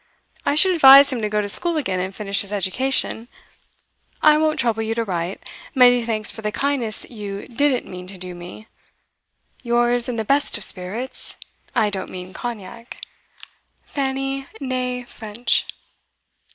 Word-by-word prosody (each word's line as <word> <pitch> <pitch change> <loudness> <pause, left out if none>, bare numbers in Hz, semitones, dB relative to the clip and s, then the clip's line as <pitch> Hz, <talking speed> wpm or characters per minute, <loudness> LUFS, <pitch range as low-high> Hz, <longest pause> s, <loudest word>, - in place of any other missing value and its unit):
I 285 - +2
should 375 +4 +5
advise 275 -3 +8
him 240 - -3
to 210 - -1
go 210 0 0
to 205 - -4
school 335 - +4
again 190 -11 -1
and 190 +1 -4
finish 200 -2 0
his 200 - -1
education. 225 +4 -1 1.0
I 305 0 +7
won't 310 0 +1
trouble 230 -2 +1
you 220 0 -2
to 230 - 0
write. 180 -2 -4 0.3
Many 245 -2 +6
thanks 220 -2 -2
for 220 - -9
the 210 -1 -2
kindness 250 -3 0
you 205 -3 -7
didn't 260 +1 +1
mean 180 0 -9
to 190 0 -8
do 180 0 -7
me. 175 +5 -10 1.0
Yours 240 0 +1
in 245 - -2
the 220 -1 -3
best 280 +1 +2
of 205 - -6
spirits 205 +8 -3 0.4
(I 210 -1 +2
don't 190 -2 -4
mean 185 0 -9
Cognac), 230 0 -7 0.9
FANNY 270 0 -3
(nee) 250 -2 -3
FRENCH. 225 0 -1
230 Hz, 155 wpm, -21 LUFS, 205-265 Hz, 1.0 s, advise